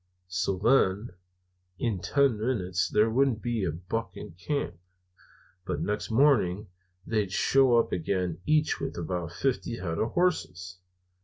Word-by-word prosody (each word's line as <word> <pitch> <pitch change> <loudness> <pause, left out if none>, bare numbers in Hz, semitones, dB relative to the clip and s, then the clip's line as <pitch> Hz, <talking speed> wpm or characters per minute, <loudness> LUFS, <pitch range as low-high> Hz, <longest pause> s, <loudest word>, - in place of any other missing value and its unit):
"So, 95 +1 -1
then, 105 -1 +2 0.7
in 110 -5 -1
ten 130 +4 +2
minutes 95 -6 -1
there 105 - +3
wouldn't 130 -1 +2
be 120 -4 -1
a 85 - 0
buck 95 +8 -5
in - - -8
camp, 90 - -4 0.8
but - - -3
next 105 0 -2
morning 110 -6 +3 0.4
they 105 -3 0
shows 120 +5 +4
up - - -18
again, 90 -1 -1
each 155 0 +2
with 135 -1 -4
about 85 0 -3
fifty 120 +3 -2
head 85 -5 -3
of 115 - -1
hosses. 95 - -1
105 Hz, 140 wpm, -28 LUFS, 90-125 Hz, 0.8 s, shows